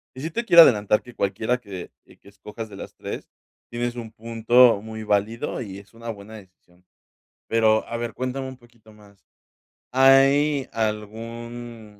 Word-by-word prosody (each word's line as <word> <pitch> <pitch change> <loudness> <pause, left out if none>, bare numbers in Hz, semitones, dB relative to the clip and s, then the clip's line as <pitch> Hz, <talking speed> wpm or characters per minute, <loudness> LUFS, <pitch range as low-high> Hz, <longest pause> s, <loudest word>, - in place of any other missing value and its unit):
y 130 - -8
sí 160 +3 -4
te 235 +5 -3
quiero 170 -5 +10
adelantar 105 -5 +3
que 120 - -13
cualquiera 110 +4 -1
que 100 -6 -9
que - - -20
que - - -18
escojas 105 +2 -9
de - - -11
las - - -9
3, - - -7 0.4
tienes 120 +1 -3
un 115 -2 -7
punto 115 0 +4
muy 110 0 -8
válido 110 +6 -1
y 95 -4 -7
es 100 +2 -18
una 115 0 -9
buena 105 0 -8
decisión, 90 -2 -20 0.6
pero, 110 -1 +3
a 115 - -4
ver, 115 -1 -4
cuéntame 130 +2 -4
un 130 - -9
poquito 120 -3 -21
más, 100 -2 -20 0.7
¿hay 135 +2 +4
algún 115 0 -5
115 Hz, 165 wpm, -23 LUFS, 105-125 Hz, 0.7 s, quiero